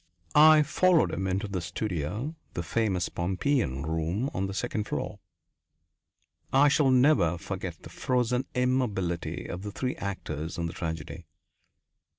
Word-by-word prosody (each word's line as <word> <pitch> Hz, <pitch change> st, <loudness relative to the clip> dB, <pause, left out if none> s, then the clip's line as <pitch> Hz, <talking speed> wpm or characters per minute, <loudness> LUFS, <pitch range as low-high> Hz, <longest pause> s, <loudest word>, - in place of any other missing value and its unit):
I 155 Hz, 0 st, +8 dB
followed 175 Hz, +3 st, +3 dB
him 95 Hz, -, -2 dB
into 95 Hz, +3 st, -1 dB
the 95 Hz, -3 st, -3 dB
studio, 105 Hz, -, -3 dB, 0.2 s
the 85 Hz, -, -2 dB
famous 95 Hz, -1 st, 0 dB
Pompeian 90 Hz, -, -1 dB
room, 80 Hz, -, -1 dB
on 95 Hz, +1 st, -1 dB
the 95 Hz, -, -5 dB
second 110 Hz, -1 st, -2 dB
floor. 105 Hz, -, -4 dB, 1.3 s
I 140 Hz, +2 st, +6 dB
shall 145 Hz, -1 st, +3 dB
never 125 Hz, -, +4 dB
forget 85 Hz, -, -6 dB
the -, -, -10 dB
frozen 125 Hz, 0 st, 0 dB
immobility 120 Hz, -9 st, 0 dB
of 90 Hz, -, -5 dB
the 105 Hz, +1 st, -5 dB
three 125 Hz, +4 st, -2 dB
actors 80 Hz, -5 st, -4 dB
in 85 Hz, -, -1 dB
the 85 Hz, -, -4 dB
tragedy. 80 Hz, -3 st, -5 dB
100 Hz, 140 wpm, -28 LUFS, 85-130 Hz, 1.3 s, I